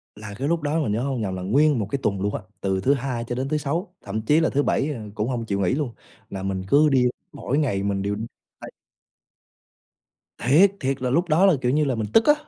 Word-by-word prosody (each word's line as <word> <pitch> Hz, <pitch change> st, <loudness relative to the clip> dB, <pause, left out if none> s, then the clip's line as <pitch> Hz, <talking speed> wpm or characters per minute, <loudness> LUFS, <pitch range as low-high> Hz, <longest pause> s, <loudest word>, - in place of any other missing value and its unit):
Là 105 Hz, -1 st, -9 dB
cái 135 Hz, -, -2 dB
lúc 165 Hz, +1 st, 0 dB
đó 150 Hz, +2 st, 0 dB
mình 120 Hz, -, -1 dB
nhớ 110 Hz, +3 st, 0 dB
hông 135 Hz, -4 st, -2 dB
lầm 95 Hz, -3 st, -2 dB
là 90 Hz, -, -5 dB
nguyên 140 Hz, +8 st, +3 dB
1 105 Hz, -, -2 dB
cái 140 Hz, -, -1 dB
tuần 100 Hz, -2 st, 0 dB
luôn 100 Hz, +1 st, -1 dB
á, -, -, -4 dB, 0.2 s
từ 95 Hz, -1 st, 0 dB
thứ 135 Hz, -, +3 dB
Hai 130 Hz, -3 st, -3 dB
cho 120 Hz, -, -3 dB
đến 135 Hz, +2 st, -2 dB
thứ 155 Hz, -, +1 dB
Sáu, 165 Hz, +6 st, -3 dB
thậm 110 Hz, +2 st, -4 dB
chí 150 Hz, +8 st, +3 dB
là 160 Hz, -, +2 dB
thứ 145 Hz, +1 st, +1 dB
Bảy, 145 Hz, +3 st, 0 dB
à, 115 Hz, -5 st, -7 dB
cũng 105 Hz, +3 st, -1 dB
hông 120 Hz, -3 st, -2 dB
chịu 100 Hz, -2 st, -2 dB
nghỉ 95 Hz, +4 st, +1 dB
luôn. 135 Hz, -4 st, -2 dB, 0.4 s
Là 95 Hz, -2 st, -6 dB
mình 95 Hz, -1 st, -2 dB
cứ 150 Hz, +5 st, +5 dB
đi, 130 Hz, -3 st, +3 dB, 0.3 s
mỗi 140 Hz, -, -2 dB
ngày 120 Hz, -11 st, 0 dB
mình 100 Hz, -1 st, -1 dB
đều 100 Hz, +1 st, -1 dB, 0.4 s
tay. -, -, -9 dB, 1.7 s
Thiệt, 155 Hz, +11 st, +5 dB
thiệt 135 Hz, 0 st, -2 dB
là 125 Hz, -, 0 dB
lúc 170 Hz, +7 st, +1 dB
đó 165 Hz, +6 st, +4 dB
là, 190 Hz, -, +6 dB
kiểu 125 Hz, -, +1 dB
như 150 Hz, +2 st, +2 dB
là, 130 Hz, -3 st, 0 dB
mình 110 Hz, -1 st, -2 dB
tức 225 Hz, -, +6 dB
á, 295 Hz, -, +7 dB
130 Hz, 260 wpm, -23 LUFS, 105-150 Hz, 1.7 s, á